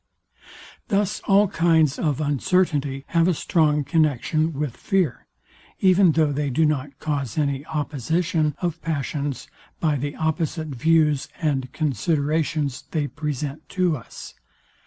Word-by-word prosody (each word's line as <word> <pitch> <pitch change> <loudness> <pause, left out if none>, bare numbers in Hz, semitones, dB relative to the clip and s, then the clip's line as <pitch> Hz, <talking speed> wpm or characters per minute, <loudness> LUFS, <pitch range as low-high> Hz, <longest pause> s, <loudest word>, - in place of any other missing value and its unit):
Thus 200 0 0
all 200 +1 +5
kinds 160 -5 +2
of 150 -4 0
uncertainty 145 -2 0
have 170 0 +3
a 180 - +2
strong 150 -2 +2
connexion 155 +1 +1
with 145 -4 -3
fear, 185 -9 -1 0.5
even 185 -2 +5
though 155 -2 +2
they 145 0 -1
do 155 +5 +2
not 145 -2 -1
cause 140 -6 -3
any 140 -2 0
opposition 155 +1 -1
of 170 -1 -2
passions 145 -2 -3 0.3
by 155 -3 +1
the 145 +2 -4
opposite 160 0 -2
views 150 +1 +2
and 135 -5 -1
considerations 150 0 -1
they 155 -3 -1
present 150 +1 -5
to 180 -3 +3
us. 120 - -10
155 Hz, 125 wpm, -23 LUFS, 140-165 Hz, 0.5 s, all